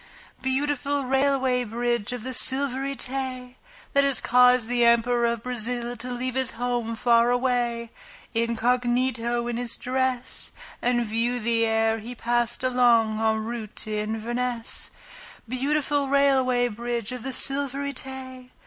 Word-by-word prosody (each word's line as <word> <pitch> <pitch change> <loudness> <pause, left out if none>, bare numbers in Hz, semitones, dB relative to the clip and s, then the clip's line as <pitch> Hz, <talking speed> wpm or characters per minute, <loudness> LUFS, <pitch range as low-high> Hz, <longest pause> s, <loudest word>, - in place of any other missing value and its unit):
Beautiful 285 +1 -1
Railway 265 -1 +1
Bridge 235 0 -2
of 245 -3 -5
the 260 +1 -4
Silvery 270 +2 +3
Tay! 255 -1 -4 0.4
That 280 - +4
has 275 -1 +3
caused 250 -1 +4
the 240 0 +1
Emperor 235 0 +3
of 235 -1 -2
Brazil 245 0 -2
to 245 +1 -6
leave 250 +1 -2
His 260 -1 0
home 240 -1 -2
far 235 +1 +3
away, 245 -2 0 0.4
incognito 240 +1 0
in 240 -1 -2
his 245 -1 -2
dress, 255 -1 -2 0.3
And 240 -1 +1
view 230 +3 0
thee 230 0 +1
ere 225 0 +1
he 235 +3 -8
passed 240 +1 -1
along 235 -4 +3
en 220 0 +1
route 225 -2 -6
to 215 -1 -1
Inverness. 230 +3 -2 0.6
Beautiful 285 +3 0
Railway 265 -3 +3
Bridge 235 0 -4
of 250 -1 -6
the 265 +3 -4
Silvery 280 +1 +1
Tay! 260 -1 -7
245 Hz, 135 wpm, -25 LUFS, 235-260 Hz, 0.6 s, That